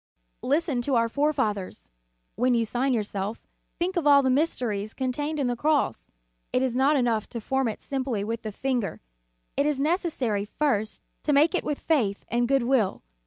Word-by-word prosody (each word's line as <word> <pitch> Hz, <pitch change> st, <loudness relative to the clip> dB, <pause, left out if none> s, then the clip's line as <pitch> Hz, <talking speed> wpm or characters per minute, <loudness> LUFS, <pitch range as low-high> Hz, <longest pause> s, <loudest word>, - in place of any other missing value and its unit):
Listen 285 Hz, -2 st, +1 dB
to 265 Hz, +2 st, 0 dB
our 230 Hz, -1 st, +3 dB
forefathers. 225 Hz, -, -1 dB, 0.4 s
"When 250 Hz, +1 st, +2 dB
you 230 Hz, -1 st, +2 dB
sign 250 Hz, +4 st, 0 dB
yourself, 210 Hz, -2 st, -2 dB, 0.3 s
think 365 Hz, +2 st, -1 dB
of 335 Hz, -4 st, +1 dB
all 280 Hz, -1 st, +7 dB
the 260 Hz, -, +3 dB
mysteries 240 Hz, -8 st, 0 dB
con 260 Hz, -1 st, -1 dB
tained 295 Hz, +4 st, -3 dB
in 280 Hz, -, 0 dB
the 245 Hz, 0 st, 0 dB
Cross. 285 Hz, -, 0 dB, 0.4 s
It 255 Hz, -, +2 dB
is 255 Hz, -2 st, 0 dB
not 275 Hz, +4 st, +4 dB
enough 235 Hz, -5 st, +1 dB
to 235 Hz, -, -5 dB
form 265 Hz, +3 st, 0 dB
it 220 Hz, -, -3 dB
simply 260 Hz, -6 st, -2 dB
with 225 Hz, +2 st, -3 dB
the 215 Hz, -, -5 dB
finger; 245 Hz, -1 st, -2 dB, 0.6 s
it 280 Hz, -, +2 dB
is 295 Hz, -3 st, 0 dB
n 280 Hz, -, +1 dB
ecessary 270 Hz, -, 0 dB
first 220 Hz, -6 st, -1 dB, 0.2 s
to 295 Hz, -, +1 dB
make 300 Hz, +5 st, +5 dB
it 365 Hz, -, 0 dB
with 295 Hz, -, -2 dB
faith 230 Hz, -11 st, 0 dB
and 240 Hz, 0 st, +1 dB
good 270 Hz, -1 st, +2 dB
will. 235 Hz, -6 st, +1 dB
255 Hz, 190 wpm, -26 LUFS, 225-290 Hz, 0.6 s, all